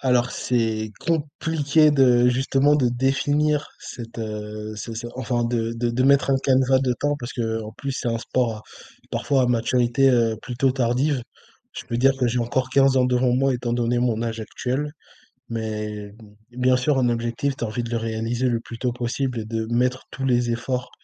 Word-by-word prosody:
alors, 125 Hz, -2 st, +2 dB
c'est 110 Hz, -3 st, -1 dB
compliqué 155 Hz, -1 st, +2 dB
de 125 Hz, -3 st, +5 dB
justement 135 Hz, +3 st, +3 dB
de 130 Hz, -4 st, +2 dB
définir 145 Hz, +4 st, +1 dB
cette, 115 Hz, -2 st, -9 dB
heu, 105 Hz, -1 st, -5 dB
c'est 115 Hz, +2 st, -6 dB
c'est 115 Hz, +1 st, -5 dB
enfin, 125 Hz, -2 st, -1 dB
de 115 Hz, -1 st, -1 dB
de 120 Hz, 0 st, -1 dB
de 120 Hz, +2 st, 0 dB
mettre 140 Hz, 0 st, +4 dB
un 135 Hz, -, +4 dB
canevas 130 Hz, 0 st, +3 dB
de 130 Hz, -2 st, +1 dB
temps 145 Hz, 0 st, +1 dB
parce 120 Hz, -2 st, -6 dB
qu'en 110 Hz, -2 st, -3 dB
plus 135 Hz, +4 st, -5 dB
c'est 125 Hz, -, -3 dB
un 115 Hz, 0 st, -1 dB
sport 115 Hz, -2 st, -1 dB, 0.5 s
parfois 135 Hz, -2 st, +1 dB
à -, -, +2 dB
maturité, 125 Hz, +2 st, +2 dB
heu, 115 Hz, -3 st, +2 dB
plutôt 125 Hz, +2 st, 0 dB
tardive. 130 Hz, +2 st, 0 dB, 0.5 s
Je -, -, -7 dB
peux 120 Hz, -, -2 dB
dire 135 Hz, +3 st, +4 dB
que 125 Hz, -, +3 dB
j'ai 120 Hz, +2 st, 0 dB
encore 125 Hz, +2 st, -1 dB
15 135 Hz, 0 st, +4 dB
ans 130 Hz, -, +4 dB
devant 125 Hz, 0 st, +2 dB
moi, 135 Hz, +1 st, +2 dB
étant 120 Hz, -1 st, -3 dB
donné 120 Hz, 0 st, +1 dB
mon 115 Hz, -2 st, 0 dB
âge 115 Hz, -1 st, -3 dB
actuel 130 Hz, +6 st, -3 dB, 0.6 s
mais 105 Hz, -2 st, -4 dB, 0.4 s
bien 125 Hz, +1 st, +2 dB
sûr, 135 Hz, +2 st, +1 dB
un 125 Hz, -, +3 dB
objectif, 120 Hz, +4 st, -1 dB
tu -, -, -10 dB
as -, -, -2 dB
envie 120 Hz, +2 st, -3 dB
de 115 Hz, -, -6 dB
le 115 Hz, -, 0 dB
réaliser 115 Hz, +3 st, -1 dB
le 120 Hz, -, +1 dB
plus 115 Hz, 0 st, -10 dB
tôt 125 Hz, +1 st, -1 dB
possible 125 Hz, +1 st, -2 dB
et -, -, -5 dB
de 110 Hz, 0 st, -3 dB
mettre 125 Hz, +2 st, 0 dB
tous 135 Hz, -, -5 dB
les 120 Hz, -2 st, +2 dB
efforts, 125 Hz, +2 st, -2 dB
125 Hz, 195 wpm, -23 LUFS, 115-135 Hz, 0.6 s, de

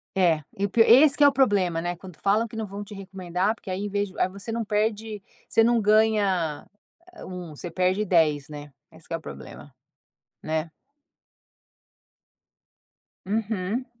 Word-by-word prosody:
É. 170 Hz, -5 st, +3 dB, 0.2 s
E 200 Hz, -, 0 dB
o -, -, -2 dB
pi 230 Hz, -, +3 dB
esse 270 Hz, +6 st, +7 dB
que 295 Hz, -, +4 dB
é -, -, +9 dB
o -, -, +5 dB
problema, 200 Hz, -11 st, +2 dB
né, 175 Hz, +1 st, -3 dB
quando 180 Hz, -2 st, -13 dB
falam 210 Hz, +6 st, +1 dB
que 225 Hz, -, -12 dB
não 220 Hz, 0 st, -3 dB
vão 200 Hz, +1 st, -7 dB
te 205 Hz, -, -11 dB
recomendar, 190 Hz, 0 st, -2 dB
porque 205 Hz, -, -12 dB
aí 190 Hz, +2 st, -3 dB
em 205 Hz, -, -3 dB
vez 205 Hz, 0 st, -1 dB
de -, -, -11 dB
aí -, -, +3 dB
você 200 Hz, +4 st, -7 dB
não 230 Hz, 0 st, -2 dB
perde 210 Hz, 0 st, -1 dB, 0.3 s
você 225 Hz, -, +3 dB
não 235 Hz, +1 st, +3 dB
ganha 205 Hz, -7 st, +2 dB, 0.5 s
a -, -, -11 dB
1, 180 Hz, -2 st, -7 dB
você 170 Hz, +4 st, -7 dB
perde 185 Hz, +4 st, +1 dB
10, 155 Hz, -7 st, +2 dB
né. 145 Hz, -1 st, -9 dB, 0.2 s
Esse 160 Hz, 0 st, -16 dB
que 165 Hz, -, -4 dB
é -, -, +2 dB
o 165 Hz, -, -10 dB
problema, 70 Hz, -, -11 dB, 0.7 s
né. 155 Hz, +1 st, -2 dB, 2.6 s
Uhum. 215 Hz, +2 st, -2 dB
195 Hz, 180 wpm, -25 LUFS, 175-215 Hz, 2.6 s, é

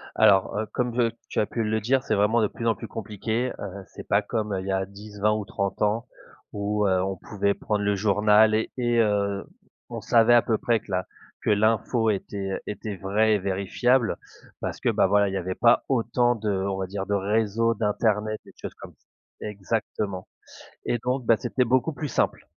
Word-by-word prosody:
Alors, 100 Hz, -2 st, +4 dB
heu, 110 Hz, -, -1 dB
comme 125 Hz, -1 st, -1 dB
j 120 Hz, -1 st, +2 dB, 0.2 s
tu -, -, -1 dB
as -, -, +3 dB
pu 115 Hz, +2 st, -3 dB
le 110 Hz, 0 st, 0 dB
dire 130 Hz, +5 st, +1 dB
c'est 110 Hz, -, 0 dB
vraiment 105 Hz, +3 st, +3 dB
de 105 Hz, -, +3 dB
plus 115 Hz, +3 st, -5 dB
en 115 Hz, -, +3 dB
plus 115 Hz, -, -8 dB
compliqué, 110 Hz, +3 st, -3 dB
heu, 100 Hz, -1 st, -7 dB
c'est -, -, -11 dB
pas 100 Hz, -, +3 dB
comme 105 Hz, -2 st, -2 dB
il 95 Hz, -, -6 dB
y -, -, 0 dB
a 95 Hz, 0 st, 0 dB
10-20 105 Hz, +1 st, -2 dB
ou 105 Hz, -1 st, -2 dB
30 100 Hz, 0 st, -3 dB
ans 110 Hz, +3 st, +1 dB, 0.5 s
où, 105 Hz, 0 st, 0 dB
heu, 95 Hz, -1 st, +2 dB
on 95 Hz, +1 st, -2 dB
pouvait 100 Hz, +1 st, -1 dB
prendre 105 Hz, 0 st, -2 dB
le 100 Hz, 0 st, +1 dB
journal 105 Hz, +2 st, +4 dB
et 110 Hz, -, -1 dB
heu, 105 Hz, -5 st, +1 dB, 0.4 s
on -, -, -6 dB
savait 115 Hz, 0 st, +4 dB
à 120 Hz, -, +7 dB
peu 110 Hz, -1 st, 0 dB
près 115 Hz, 0 st, +1 dB
que 105 Hz, -, -14 dB
la 95 Hz, 0 st, -1 dB, 0.3 s
que -, -, -1 dB
l'info 110 Hz, +2 st, +2 dB
était 100 Hz, -1 st, -4 dB
était 105 Hz, -1 st, -5 dB
vraie 105 Hz, +4 st, +2 dB
et -, -, 0 dB
vérifiable 100 Hz, +6 st, +1 dB, 0.4 s
parce -, -, -4 dB
que, -, -, +2 dB
beh, -, -, +3 dB
voilà 100 Hz, +1 st, +3 dB
il -, -, -5 dB
y -, -, -1 dB
avait 95 Hz, 0 st, -3 dB
pas 120 Hz, 0 st, +4 dB
autant 120 Hz, -1 st, +2 dB
de 110 Hz, -2 st, -3 dB
on 95 Hz, 0 st, -1 dB
va 95 Hz, -1 st, -3 dB
dire 95 Hz, +1 st, -4 dB
de 100 Hz, -, -2 dB
réseau 110 Hz, +3 st, +1 dB
d'internet 110 Hz, 0 st, 0 dB
des -, -, -14 dB
choses -, -, -6 dB
comme -, -, -12 dB
ça. -, -, -40 dB, 0.4 s
Exactement, 100 Hz, -2 st, -3 dB, 0.6 s
et 120 Hz, -, 0 dB
donc, 125 Hz, +2 st, -2 dB
ben, 115 Hz, -, +5 dB
c'était 125 Hz, +3 st, 0 dB
beaucoup 130 Hz, +6 st, +1 dB
plus 145 Hz, 0 st, -5 dB
simple, -, -, 0 dB
105 Hz, 205 wpm, -25 LUFS, 100-115 Hz, 0.6 s, à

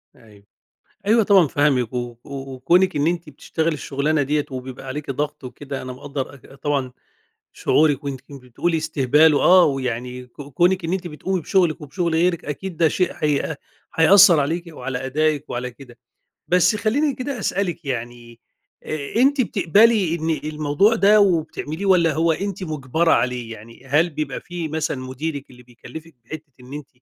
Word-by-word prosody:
أيوه، 105 Hz, -3 st, -19 dB, 0.6 s
أيوه 225 Hz, 0 st, +4 dB
طبعًا 195 Hz, -6 st, +5 dB
فاهمِك، 130 Hz, -5 st, +1 dB
و 120 Hz, -1 st, -4 dB
وكونِك 140 Hz, +7 st, 0 dB
إن 145 Hz, +2 st, +1 dB
أنتِ 170 Hz, -2 st, -2 dB
بتشتغلي 160 Hz, +3 st, -2 dB
الشغلانة 145 Hz, +1 st, -1 dB
دِيَّة 145 Hz, +1 st, 0 dB
وبيبقى 130 Hz, +1 st, -7 dB
عليكِ 140 Hz, +1 st, -4 dB
ضغط 150 Hz, +1 st, -4 dB
وكده، 135 Hz, +2 st, -7 dB
أنا 130 Hz, 0 st, -7 dB
مقدر 140 Hz, +1 st, -6 dB
أك 135 Hz, -, -16 dB
طبعًا 140 Hz, -2 st, -2 dB, 0.6 s
شعورِك، 150 Hz, -2 st, +2 dB
وأنتِ 135 Hz, -2 st, -4 dB
بتقولي 140 Hz, +5 st, -3 dB
استهبال 155 Hz, 0 st, +3 dB
وآه، 180 Hz, +5 st, +6 dB
ويعني 125 Hz, -2 st, -3 dB
ك 135 Hz, -, -12 dB
كونِك 175 Hz, +6 st, +1 dB
إن 170 Hz, -, -2 dB
أنتِ 185 Hz, -2 st, -3 dB
بتقومي 180 Hz, +3 st, -3 dB
بشغلك 175 Hz, -3 st, +1 dB
وبشغل 165 Hz, +3 st, -2 dB
غيرِك 170 Hz, 0 st, +1 dB
أكيد 165 Hz, +4 st, -6 dB
ده 165 Hz, -, +4 dB
شيء 180 Hz, +3 st, 0 dB
هيأ 150 Hz, 0 st, -1 dB, 0.4 s
هيأثر 180 Hz, 0 st, +7 dB
عليكِ 165 Hz, +5 st, -1 dB
وعلى 130 Hz, -4 st, -5 dB
أدائك 150 Hz, +1 st, 0 dB
وعلى 125 Hz, +1 st, -4 dB
كده. 125 Hz, -2 st, -15 dB, 0.5 s
بس 180 Hz, +5 st, +3 dB
خليني 270 Hz, +8 st, 0 dB
كده 255 Hz, 0 st, -5 dB
أسألِك 180 Hz, -5 st, -2 dB
يعني، 120 Hz, -2 st, -6 dB, 0.8 s
أنتِ 270 Hz, +3 st, +3 dB
بتقبلي 200 Hz, -2 st, +3 dB
إن 165 Hz, -1 st, -2 dB, 0.2 s
الموضوع 155 Hz, +9 st, +2 dB
ده 210 Hz, 0 st, +5 dB
وبتعمليه، 170 Hz, -1 st, 0 dB
والَّا 170 Hz, -4 st, +4 dB
هو 165 Hz, +2 st, +2 dB
أنتِ 195 Hz, +2 st, -4 dB
مجبرة 155 Hz, +1 st, 0 dB
عليه؟ 125 Hz, -2 st, 0 dB
يعني 115 Hz, +3 st, -13 dB
هل 155 Hz, +6 st, +2 dB
بيبقى 150 Hz, -3 st, -4 dB
في 175 Hz, -3 st, -6 dB
مثلًا 155 Hz, -2 st, -2 dB
مديرِك 140 Hz, +3 st, -5 dB
اللي 125 Hz, -1 st, -15 dB
بيكلفك 125 Hz, +7 st, -12 dB
بحتة 155 Hz, +1 st, -9 dB
إن 125 Hz, +2 st, -13 dB
أنتِ 145 Hz, -2 st, -7 dB
150 Hz, 155 wpm, -21 LUFS, 130-175 Hz, 0.8 s, هيأثر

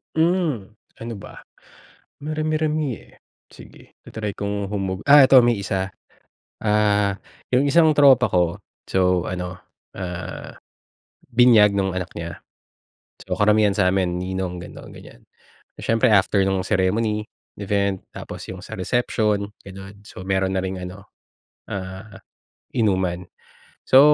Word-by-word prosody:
Hmm, 160 Hz, -, 0 dB, 0.2 s
ano 115 Hz, +1 st, -7 dB
ba? -, -, -12 dB, 0.8 s
Marami-rami, 155 Hz, -2 st, -1 dB
eh. -, -, -20 dB, 0.3 s
Sige, -, -, -16 dB
ta-try 105 Hz, -2 st, -5 dB
kong 100 Hz, 0 st, -3 dB
humog 95 Hz, -2 st, -3 dB
ah, 145 Hz, -1 st, +9 dB
ito 130 Hz, 0 st, +7 dB
may 120 Hz, 0 st, +3 dB
isa. 95 Hz, -1 st, -2 dB, 0.8 s
Ah, 105 Hz, -2 st, +2 dB, 0.3 s
'yung 130 Hz, +3 st, +3 dB
isang 160 Hz, +3 st, +5 dB
tropa 140 Hz, -4 st, +6 dB
ko, 85 Hz, -2 st, +1 dB, 0.3 s
so 90 Hz, -1 st, +1 dB
ano, 90 Hz, 0 st, -5 dB, 0.4 s
ah, 90 Hz, -1 st, -6 dB, 0.8 s
binyag 115 Hz, -4 st, +5 dB
'nung 95 Hz, -1 st, 0 dB
anak 90 Hz, -1 st, -4 dB
niya. 85 Hz, 0 st, -6 dB, 0.8 s
So -, -, -2 dB
karamihan 105 Hz, -1 st, +4 dB
sa'min 90 Hz, -2 st, +1 dB
ninong 90 Hz, -1 st, -4 dB
gano'n, 85 Hz, -, -11 dB
ganyan. -, -, -14 dB, 0.6 s
Siyempre 115 Hz, +1 st, +2 dB
after 100 Hz, 0 st, +3 dB
'nung 95 Hz, -1 st, 0 dB
ceremony, 105 Hz, +2 st, 0 dB, 0.3 s
event, 100 Hz, -1 st, -1 dB
tapos -, -, -8 dB
'yung 95 Hz, -, -9 dB
sa 110 Hz, -, -9 dB
reception, 105 Hz, 0 st, 0 dB, 0.2 s
gano'n. 95 Hz, +1 st, -11 dB
So, 95 Hz, -, -10 dB
meron 95 Hz, 0 st, 0 dB
na 95 Hz, -, +1 dB
ring 95 Hz, 0 st, -3 dB
ano, 90 Hz, +2 st, -9 dB, 0.6 s
ah, 95 Hz, +2 st, -7 dB, 0.6 s
inuman. 95 Hz, -5 st, 0 dB, 0.6 s
So, 130 Hz, -, +7 dB
100 Hz, 120 wpm, -22 LUFS, 95-115 Hz, 0.8 s, ah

